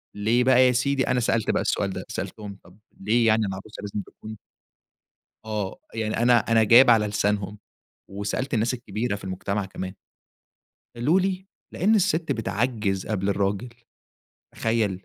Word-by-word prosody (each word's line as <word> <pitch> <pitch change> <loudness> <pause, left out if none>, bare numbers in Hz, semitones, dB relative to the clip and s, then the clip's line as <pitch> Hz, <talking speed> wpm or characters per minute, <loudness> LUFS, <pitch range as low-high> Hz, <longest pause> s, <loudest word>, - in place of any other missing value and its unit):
ليه 115 +4 +2
بقى 130 0 +5
يا - - +4
سيدي؟ 135 +2 0
أنا 125 0 +1
سألت 115 -2 +1
بقى - - 0
السؤال 100 -1 0
ده، - - -6
سألتهم، 100 -2 -6
طب 90 +4 -19 0.2
ليه 115 +3 +2
يعني 110 -1 +3
العروسة 95 +2 -7
لازم 105 0 -4
تكون 110 +2 -11 1.1
آه. 105 -3 -4
يعني 110 -1 -2
أنا 120 +1 +4
أنا 115 0 +2
جايب 120 +4 +7
على 110 -3 +5
لسانهم 105 -1 -1 0.5
وسألت 100 +8 -3
الناس 115 +3 +1
الكبيرة 115 -2 -3
في 100 - -11
المجتمع 95 +2 -3
كمان، 95 0 -6 1.0
قالوا 150 +11 +2
لي: 190 0 -2 0.3
"لإن 215 +4 +2
السِت 165 -4 +1
بتعجّز 110 -3 -1
قبل 100 -2 -1
الراجل." 100 +4 -1 0.9
تخيل؟! 110 -2 0
110 Hz, 150 wpm, -24 LUFS, 100-125 Hz, 1.1 s, جايب